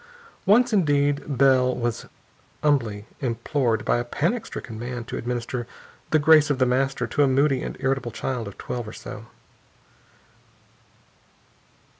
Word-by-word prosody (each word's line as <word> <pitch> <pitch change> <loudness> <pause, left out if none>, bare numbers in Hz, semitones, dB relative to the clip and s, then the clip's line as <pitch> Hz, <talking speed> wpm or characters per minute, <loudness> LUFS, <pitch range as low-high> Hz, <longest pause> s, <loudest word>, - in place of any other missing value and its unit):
Once, 240 +4 +5
indeed, 145 -6 +2 0.2
Bell 130 -1 +4
was 120 -2 -3 0.6
humbly 115 -9 +1
implored 120 -1 -1
by - - +2
a - - -1
panic 170 - -1
stricken 110 -2 -7
man 120 0 -5
to - - -7
administer 120 0 -3 0.4
"the 155 - +4
grace 155 0 +5
of 145 - +1
The 130 - +3
Master" 130 0 0
to 120 - -1
a 140 - +5
moody 135 0 +2
and - - -5
irritable 135 -2 -1
child 120 -1 -4
of 100 - -10
twelve 120 -3 -5
or 110 - -8
so. 110 +2 -9
130 Hz, 140 wpm, -24 LUFS, 120-145 Hz, 0.6 s, Once